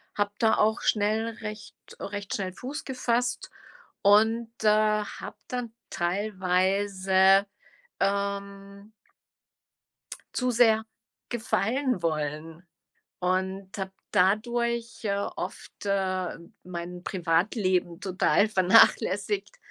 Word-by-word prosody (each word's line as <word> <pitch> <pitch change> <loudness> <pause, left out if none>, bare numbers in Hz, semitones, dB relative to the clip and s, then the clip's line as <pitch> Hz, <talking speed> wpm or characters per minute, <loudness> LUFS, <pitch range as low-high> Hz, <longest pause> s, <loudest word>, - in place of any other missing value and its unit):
habe 205 0 0
da 225 -2 +3
auch 220 +2 +2
schnell 215 +2 +1
recht 215 -1 -7 0.2
recht 200 0 -5
schnell 185 -2 -3
Fuß 270 +9 -6
gefasst 245 -1 -1 0.5
und, 220 +3 +4
äh, - - +3
habe 215 0 0
dann 245 -3 -4 0.2
teilweise 190 +1 +2 0.5
,ähm 200 +1 -3 1.4
zu 250 -1 0
sehr 225 -2 +4 0.4
gefallen 240 +1 0
wollen 155 +1 -3 0.6
und 190 +2 -2
habe 190 -1 -4 0.2
dadurch, 235 +4 +1
äh, 200 -2 0
oft, 200 0 -6
äh, 185 -3 -1 0.3
mein 175 0 -7
Privatleben 180 0 0
total 195 +2 +2
vernachlässigt. 215 - +3
200 Hz, 90 wpm, -27 LUFS, 185-220 Hz, 1.4 s, und